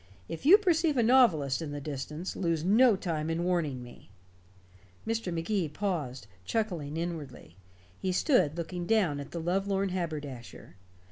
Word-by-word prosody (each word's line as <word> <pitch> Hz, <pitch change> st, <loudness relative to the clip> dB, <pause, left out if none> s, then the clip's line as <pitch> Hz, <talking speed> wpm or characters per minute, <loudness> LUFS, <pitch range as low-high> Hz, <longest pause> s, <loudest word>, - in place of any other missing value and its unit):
If 165 Hz, -, -5 dB
you 385 Hz, +6 st, +10 dB
perceive 335 Hz, -7 st, +2 dB
a 240 Hz, -, +4 dB
novelist 180 Hz, -, +4 dB
in 160 Hz, -, -4 dB
the 145 Hz, -, -4 dB
distance, 150 Hz, +4 st, -5 dB
lose 165 Hz, -4 st, -1 dB
no 220 Hz, +5 st, +5 dB
time 165 Hz, -4 st, -3 dB
in 165 Hz, +1 st, -1 dB
warning 160 Hz, -8 st, -1 dB
me." 120 Hz, -4 st, -14 dB, 1.0 s
Mr. 225 Hz, -4 st, -2 dB
Magee 170 Hz, +1 st, -1 dB
paused, 150 Hz, -, -3 dB, 0.2 s
chuckling 165 Hz, -, -2 dB
inwardly. 155 Hz, -, -6 dB, 0.4 s
He 190 Hz, -, -1 dB
stood 180 Hz, -, +2 dB
looking 175 Hz, +1 st, -4 dB
down 190 Hz, -10 st, +2 dB
at 140 Hz, -, -7 dB
the 170 Hz, -, -5 dB
lovelorn 195 Hz, +3 st, 0 dB
haberdasher. 150 Hz, -, -6 dB
170 Hz, 145 wpm, -29 LUFS, 150-200 Hz, 1.0 s, you